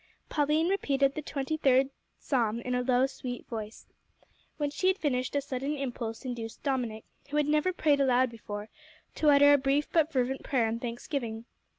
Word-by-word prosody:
Pauline 300 +2 +2
repeated 275 -8 +1
the 310 - -4
twenty 285 +1 -3
third 270 -2 +3 0.3
Psalm 235 -5 0
in 250 +1 -3
a 250 - +1
low, 250 0 +3
sweet 250 -2 -6
voice. 220 -1 -7 0.7
When 290 -1 -1
she 370 - 0
had 375 0 +3
finished, 255 -6 -1
a 285 - +2
sudden 275 +1 -3
impulse 240 -4 -5
induced 235 -3 -6
Dominick, 245 -6 -2 0.2
who 295 - -1
had 300 - +3
never 305 +5 +2
prayed 300 -5 +2
aloud 255 -2 +3
before, 210 -2 -7 0.5
to 305 - +2
utter 285 0 +7
a 285 - +5
brief 275 +3 +1
but 320 -1 +3
fervent 265 -1 0
prayer 250 -5 +1
and 230 +1 -3
thanksgiving. 235 -1 -4
270 Hz, 180 wpm, -29 LUFS, 245-290 Hz, 0.7 s, utter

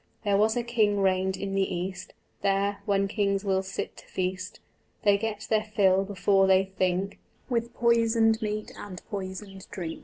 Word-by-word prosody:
There 205 -2 +2
was 220 +3 +3
a 240 - 0
king 215 -4 +2
reigned 190 0 +1
in 195 0 -4
the 195 0 +1
East: 185 +2 -5 0.3
There, 200 +1 +1
when 195 -1 +2
kings 200 -1 0
will 190 -1 +2
sit 195 +1 -5
to - - -13
feast, 185 0 -3 0.4
They 205 -1 +5
get 210 0 -3
their 215 -1 +2
fill 195 -2 +4
before 195 0 +2
they 190 0 +5
think 190 0 -1 0.3
With 235 -1 -1
poisoned 230 -1 +3
meat 215 0 -3
and 185 -3 -8
poisoned 195 0 -6
drink. 165 -4 -5
195 Hz, 165 wpm, -27 LUFS, 190-215 Hz, 0.4 s, They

